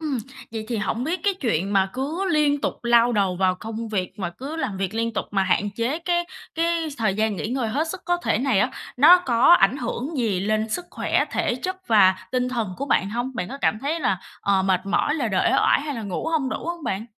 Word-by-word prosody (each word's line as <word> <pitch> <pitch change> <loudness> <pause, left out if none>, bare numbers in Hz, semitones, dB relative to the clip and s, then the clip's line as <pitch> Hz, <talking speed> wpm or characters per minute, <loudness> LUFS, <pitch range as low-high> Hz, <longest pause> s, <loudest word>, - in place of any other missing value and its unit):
Ừm, 295 -5 -2 0.3
vậy 220 -1 -4
thì 235 - -1
hổng 225 +4 -2
biết 340 +3 -2
cái 400 -1 +2
chuyện 205 - -1
mà 190 -1 +2
cứ 300 +9 -2
liên 295 -2 +2
tục - - -3
lao 235 0 +4
đầu 195 -4 +1
vào 185 -1 +2
công 225 +4 -6
việc 195 -1 -3
mà 175 -3 -3
cứ 275 - -7
làm 255 -10 -3
việc 195 +2 -3
liên 230 0 -1
tục - - -2
mà 195 -1 +1
hạn 195 +2 +1
chế 235 +9 -2
cái 345 0 0 0.3
cái 335 0 0
thời 215 -4 +1
gian 215 -1 0
nghỉ - - -3
ngơi 250 -3 -1
hết 300 +8 -1
sức 370 +3 -5
có 350 0 +1
thể 345 - 0
này 250 -6 +2
á, 250 - +2 0.3
nó 320 +8 +8
có 240 +5 +5
ảnh 310 -6 +5
hưởng 260 +4 -4
gì 205 -6 0
lên 215 +2 0
sức 355 +10 -3
khỏe, - - 0
thể - - 0
chất 370 0 -4
và 190 -4 +5 0.2
tinh 250 0 +1
thần 230 -5 -2
của 280 - -4
bạn 200 -6 +1
hông? 240 +3 -2
Bạn 180 -5 -3
có 275 - -7
cảm 215 - +1
thấy 300 +6 -2
là, 195 - +1 0.2
ờ, 195 -1 +2
mệt 190 0 0
mỏi, 295 +8 +1
lờ 265 -8 -1
đờ, 190 - +1
uể - - +3
oải, - - +4
hay 290 -1 -4
là 230 - -5
ngủ 200 - -3
hông 305 -5 0
đủ - - -5
hông 340 -2 -4
bạn? 200 +4 -3
235 Hz, 250 wpm, -23 LUFS, 205-295 Hz, 0.3 s, nó